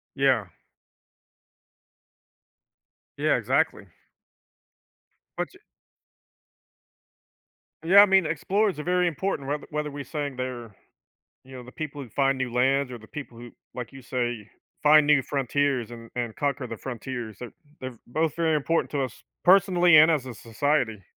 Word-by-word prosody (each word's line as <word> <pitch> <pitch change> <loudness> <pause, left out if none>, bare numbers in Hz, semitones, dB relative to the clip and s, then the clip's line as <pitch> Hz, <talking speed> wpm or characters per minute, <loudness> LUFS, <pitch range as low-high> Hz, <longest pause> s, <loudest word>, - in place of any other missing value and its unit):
Yeah. - - +2 2.7
Yeah, - - +2
exactly. - - 0 1.5
But - - -2
ch 385 - -18 2.3
Yeah, 190 +5 +8
I - - +8
mean, 190 -3 +4
explorers 185 +5 0
are - - -4
very 180 +1 +2
important 165 -3 -2
whether 145 0 -3
whether 150 0 -3
we 145 0 -6
saying 145 0 -4
they're, 120 -4 -5 0.7
you 130 - -15
know, 125 - -8
the 125 - -13
people 150 0 -6
who 130 - -9
find 135 +2 +1
new 130 -2 -3
lands, 130 +2 +1
or 125 - -6
the 110 -1 -16
people 135 -4 -9
who 120 0 -10 0.2
like 125 -2 -6
you 135 - -11
say, 120 -4 -3 0.3
find 150 0 +6
new 150 -2 +5
frontiers 135 -2 -1
an 115 -1 -10
and 120 -3 -3
conquer 140 -3 -2
the 115 - -6
frontiers, 120 -3 -6
they're 125 - -8 0.3
they're 130 -2 -7
both 155 +5 -1
very 165 -2 +1
important 165 +3 0
to 140 -2 0
us 130 -4 -7 0.2
personally, 180 -3 +6
and 155 +2 +8
as 145 -5 0
a 125 - -7
society. 115 -2 -1
135 Hz, 145 wpm, -26 LUFS, 120-155 Hz, 2.7 s, Yeah